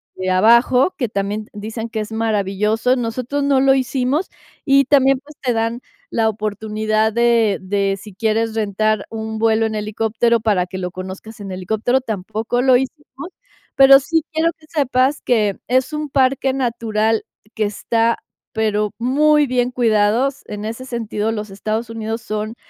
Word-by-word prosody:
de 185 0 -3
abajo, 235 - +4
que 250 -5 -1
también 205 +1 -3
dicen 220 +2 -5
que 220 -1 -4
es 215 - -7
maravilloso. 220 +2 0
Nosotros 250 +4 -2
no 280 -1 +3
lo 270 0 +5
hicimos 265 +4 0 0.4
y 275 -1 +5
también, 270 0 +4
pues, 290 +2 -17
te 250 -3 0
dan 230 +1 -1 0.3
la 225 -1 +1
oportunidad 215 +1 -1
de 230 -3 +3
de 195 +1 -1
si 210 +1 -12
quieres 220 +2 0
rentar 215 0 0
un 220 0 -5
vuelo 225 0 +2
en 220 -1 -2
helicóptero 225 +2 0
para 205 -5 +1
que 185 +1 -8
lo 180 -1 -4
conozcas 190 +4 -8
en 195 -2 -6
helicóptero, 220 +7 0
tampoco 220 +2 -2
lo 260 0 +5
hicimos. 270 +3 -4 0.5
Pero 270 0 +8
sí 320 +3 0
quiero 320 +1 +2
que 310 - -19
sepas 275 -2 +1
que 210 -5 +1
es 260 +4 +1
un 300 -1 -3
parque 265 0 +2
natural 225 -4 0 0.3
que 220 - 0
está 225 +3 0 0.3
pero 210 -1 0
muy 295 +5 +3
bien 250 -1 0
cuidados, 235 +3 +1
en 210 0 -6
ese 225 +3 -5
sentido, 225 -3 -3
los 215 -1 -4
Estados 215 +4 -3
Unidos 225 0 -4
son, 215 +1 -4
225 Hz, 160 wpm, -19 LUFS, 215-255 Hz, 0.5 s, Pero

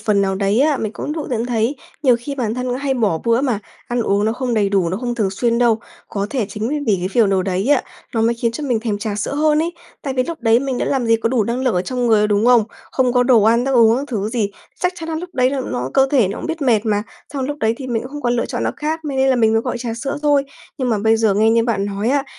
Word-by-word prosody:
phần 210 -2 +2
nào 195 -1 0
đấy 200 +5 +1
á, 300 0 +3
mình 220 -3 -3
cũng 300 - -4
tự 320 - -3
nhận 235 -1 -1
thấy 240 +3 0 0.3
nhiều 255 -5 +5
khi 280 +4 -5
bản 235 -5 -2
thân 250 0 -2
hay 270 0 -1
bỏ 210 -10 +1
bữa 230 +1 +3
mà 255 -6 0 0.3
ăn 245 0 0
uống 200 -1 +1
nó 220 - +1
không 245 0 -2
đầy 205 -2 +2
đủ, 195 -4 +1
nó 185 - -2
không 240 +2 -3
thường 210 -5 0
xuyên 235 +4 0
đâu. 235 -2 +3 0.3
Có 200 -1 -2
thể 245 -7 -1
chính 210 +3 -3 0.2
vì 205 - +3
cái 180 +1 -2
phiều 220 +2 +3
đồ 190 -1 +1
đấy 190 +5 -1
á, 290 -3 +4 0.3
nó 225 - +1
mới 230 +1 +2
khiến 235 0 -1
cho 295 +5 -5
mình 240 -5 0
thèm 215 -3 -2
trà 205 0 -3
sữa 210 +6 -3
hơn 300 +1 +2
ấy, 330 +2 0 0.3
tại 270 -2 -3
vì 255 - +2
lúc 330 +2 -6
đấy 225 0 +4
mình 265 -1 -2
đã - - 0
làm 260 -4 0
gì 230 0 +4
có 225 0 -1
đủ 240 -4 +1
năng 235 +4 -2
lượng 255 -4 +1
ở 180 - +1
trong 250 +4 -2
người, 210 -2 +4
đúng 210 +2 +1
không? 245 -2 +6 0.3
Không 255 -2 +2
có 250 0 +4
đồ 245 -4 +5
ăn 230 +3 +3
thức 270 - 0
uống 230 -1 +5
các 275 - -2
thứ 215 -5 -2
gì, 220 -4 -1 0.3
chắc 360 0 +1
chắn 330 -1 -7
là 320 - -2
lúc 350 +2 -5
đấy 255 0 +3
là 275 -1 -2
nó 125 +1 -3
cơ 270 0 +5
thể 245 -10 +3
nó 200 - -5
cũng - - -5
biết 325 -1 -3
mệt 230 -5 +2
mà, 210 -1 +1 0.3
xong 275 -2 -2
lúc 290 +2 -4
đấy 220 +1 +2
thì 265 - -7
mình 235 -3 -1
cũng 255 - -9
không 295 0 -7
còn 240 - +1
lựa 235 - 0
chọn - - -3
nó - - +1
khác 315 +2 -3
mê 280 -2 -3
nên 265 0 +3
là 260 - +3
mình 225 -2 +3
mới 225 - +3
gọi - - -3
trà 235 -2 -4
sữa 275 +5 -4
thôi. 290 -2 +3 0.3
Nhưng 255 -2 -1
mà 220 - +1
bây 220 +2 +3
giờ 220 -3 +2
nghe 215 +2 +3
như 230 0 +3
bạn 215 -4 0
nói 205 +2 -2
á, 275 +1 +1
235 Hz, 315 wpm, -19 LUFS, 215-265 Hz, 0.3 s, không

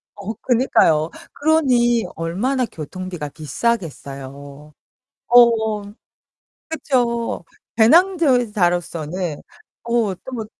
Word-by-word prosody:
어, 205 +2 -5
그니까요. 170 - +3 0.2
그러니 255 -7 +2
얼마나 225 +11 -1
교통비가 175 -2 -7
비싸겠어요. 145 - -5 0.6
어어. 220 -4 +4 0.8
그쵸. 245 - -1 0.3
배낭저 270 - +4
자로서는 175 -3 -1 0.5
어 235 -4 0
또 260 - -11
뭐 225 -3 -4
220 Hz, 195 characters per minute, -20 LUFS, 165-245 Hz, 0.8 s, 어어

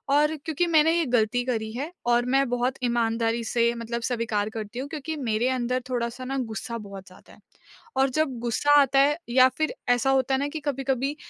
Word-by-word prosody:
और 300 +2 +3
क्योंकि 325 +2 0
मैंने 320 -1 +4
ये 335 - +1
गलती 240 +2 +1
करी 220 -3 -2
है 285 +7 -4 0.2
और 240 0 +3
मैं 275 0 +3
बहुत 245 +2 0
ईमानदारी 230 -1 0
से 235 +1 +1
मतलब 235 0 -4
स्वीकार 225 -4 -1
करती 220 +1 -6
हूँ 270 - -4
क्योंकि 315 +1 -5
मेरे 235 -2 0
अंदर 255 0 -1
थोड़ा-सा 245 +1 -3
ना 270 +1 -3 0.2
गुस्सा 235 +1 -5
बहुत 200 -3 -10
ज़्यादा 185 - -17
है। - - -19 0.6
और 270 +1 +3
जब 295 -5 0
गुस्सा 240 +5 0
आता 275 0 +3
है 290 +2 +4
या 255 +1 +6
फ़िर 310 0 0 0.2
ऐसा 245 +1 +3
होता 265 0 +2
है - - 0
ना 285 - -1
कि 315 - -5
कभी-कभी 270 0 -1
250 Hz, 200 wpm, -25 LUFS, 235-275 Hz, 0.6 s, या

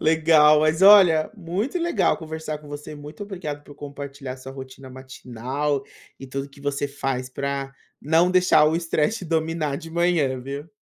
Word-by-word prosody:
Legal. 155 -1 +5
Mas 155 +3 +1
olha, 190 -6 +7
muito 200 - -3
legal 335 - +1
conversar 160 -1 -6
com 150 -1 -15
você. 145 +1 -8
Muito 150 +6 -10
obrigado 175 -8 -6
por 145 - -13
compartilhar 140 -2 -8
sua 130 +1 -10
rotina 130 0 -10
matinal 130 +2 -4 0.4
e 135 - -9
tudo 135 +1 -5
que 140 0 -18
você 145 0 -2
faz 135 -2 -3
pra 140 0 -4 0.3
não 165 +4 +3
deixar 180 -4 +4
o 155 +1 +2
estresse 170 +5 0
te 185 - -7
dominar 160 -2 -1
de 165 +2 -9
manhã, 165 -6 +1
viu. 140 +5 -7
150 Hz, 165 wpm, -23 LUFS, 140-165 Hz, 0.4 s, olha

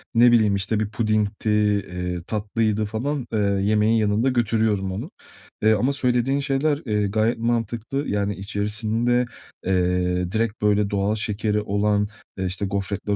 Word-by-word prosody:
ne 120 +1 +7
bileyim, 110 -4 +4
işte, 100 +2 0
bir 110 -1 -1
pudingdi, 110 -1 -1
eee, 90 -5 0
tatlıydı 110 0 0
falan, 125 +5 -3
eee, 110 - +1
yemeğin 105 +2 +2
yanında 110 +3 +2
götürüyorum 110 -5 +1
onu. 95 - -5 0.5
Eee, 110 0 +5
ama 125 +6 +1
söylediğin 125 0 +1
şeyler, 140 +2 0
eee, 105 -2 0
gayet 110 +4 +1
mantıklı. 120 +4 -2
Yani 100 0 -1
içerisinde, 110 +5 0 0.4
eee, 90 -1 +1
direkt 110 -1 -1
böyle 105 -1 +2
doğal 100 +1 0
şekeri 105 0 -1
olan, 105 0 +1 0.3
eee, 95 - -2
işte, 95 +2 -2
gofretler 100 +1 -2
105 Hz, 140 wpm, -23 LUFS, 100-115 Hz, 0.5 s, ne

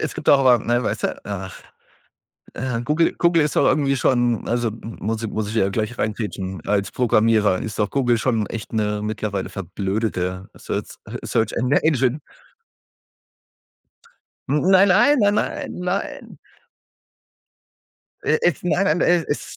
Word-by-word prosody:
Es - - -3
gibt - - -5
doch 140 - +7
aber 125 -3 +5
ne, 120 +3 0
weißte, - - -2
ach 95 -2 -7 0.9
äh, 125 -1 -3
Google 150 +5 +1
Google 170 -2 +3
ist 150 - -2
doch - - +4
irgendwie 140 -2 +2
schon 120 -2 +1
also 120 -1 0
muss 115 0 -5
ich 110 - -2
muss 110 -2 -3
ich 110 - -5
ja 100 -4 +2
gleich 110 +3 -3
reingrätschen 100 -4 -3
als 100 -1 0
Programmierer 110 -5 +2
ist 110 -2 -6
doch 105 -1 0
Google 120 -4 +1
schon 115 -3 0
echt 115 0 -7
'ne 105 -1 -1
mittlerweile 105 -2 -3
verblödete 95 0 -3
Searz - - -5 0.3
Search 110 -1 0
En 125 +2 -1
Engine. 145 -2 +2 2.3
N 145 +2 +1
nein, 190 +1 +6
nein, 240 +11 +5
nein, 205 0 +3
nein, - - -2
nein. 180 +2 -4 1.8
Äh, - - +1
es 175 -5 +1
nein, 180 +2 +1
nein, - - -4
äh, 175 -2 +3
es 145 - -4
115 Hz, 145 wpm, -21 LUFS, 105-140 Hz, 2.3 s, doch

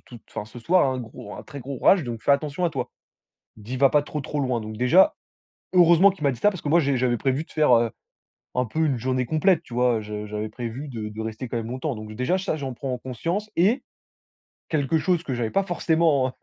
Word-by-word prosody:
t 120 - -13
t - - -34
enfin, 105 - -5
ce 120 +2 -11
soir 175 +6 +3
un 130 - -2
gros, 110 -3 -9
un - - -8
très 140 - -9
gros 135 +2 -6
orage, 190 -4 +5
donc 120 -3 -6
fais - - +1
attention 150 +4 +1
à 170 - +2
toi». 130 -3 -3 0.7
Il 110 - -15
me - - -15
dit: 125 +2 -4
«Va 135 0 +5
pas 150 - +3
trop, 150 +1 -5
trop 145 +1 -4
loin». 125 -3 0
Donc 110 0 -7
déjà, 125 - +5 0.6
heureusement 175 +1 +6
qu'il 185 - -13
m'a 140 - +3
dit 125 - -6
ça 205 - +4
parce 185 -5 -8
que 145 - -3
moi 170 +3 +5
j'ai 140 -4 +2
j'avais 125 -1 +1
prévu 135 +5 0
de - - -16
faire 150 -5 +4
heu, 115 -1 +2 0.6
un 125 0 +1
peu 160 +8 0
une 140 -5 +1
journée 130 +1 0
complète 160 +5 +2
tu 125 - -12
vois? 125 -1 +3
Heu, 110 - -4
je 105 0 -6
j'avais 105 +1 -4
prévu 120 +5 -6
de 110 -5 -5
de 110 +1 -6
rester 110 +3 -5
quand 120 - -3
même 115 -1 -4
longtemps. 130 +1 -3
Donc 110 0 -8
déjà 125 - 0
ça, 185 -4 -2
j'en 135 -3 -4
prends 130 0 -3
conscience 170 - -3
et 205 +10 +3 0.9
quelque 155 0 +1
chose 180 -1 +1
que 135 - -3
j'avais 120 -2 -1
pas 195 - +1
forcément 160 -7 +1
130 Hz, 255 wpm, -24 LUFS, 120-160 Hz, 0.9 s, heureusement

